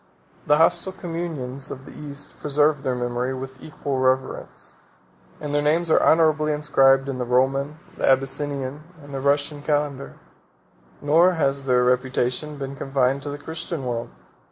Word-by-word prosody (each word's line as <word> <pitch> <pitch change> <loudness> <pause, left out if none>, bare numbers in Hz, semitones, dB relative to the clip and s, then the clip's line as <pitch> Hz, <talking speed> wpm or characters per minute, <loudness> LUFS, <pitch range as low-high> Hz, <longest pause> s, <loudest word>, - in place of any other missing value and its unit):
The 150 - +5
hostile 175 +3 +3
communions 165 -8 -5
of 135 0 -8
the - - -11
East 145 -1 -6
preserve 145 0 +2
their 130 -2 -1
memory 125 +1 -2
with 130 0 -8
equal 140 -3 -4
reverence; 130 0 -1 0.6
and 145 -1 -5
their 145 - +2
names 160 +3 +1
are - - +5
honorably 155 -1 +4
inscribed 135 -2 +4
in 135 -2 -3
the - - 0
Roman, 135 +4 +1 0.2
the - - +2
Abyssinian, 135 +1 0 0.2
and 145 0 -11
the 135 - -3
Russian 145 +1 +1
calendar. 145 -2 -1 0.9
46 - - -17
Nor 165 +5 +5
has 140 -4 0
their 125 -1 +4
reputation 125 +3 0
been 135 0 -5
confined 135 0 0
to 145 - -5
the 145 - -5
Christian 160 -1 -5
world. 120 -2 -3
140 Hz, 155 wpm, -23 LUFS, 130-150 Hz, 0.9 s, The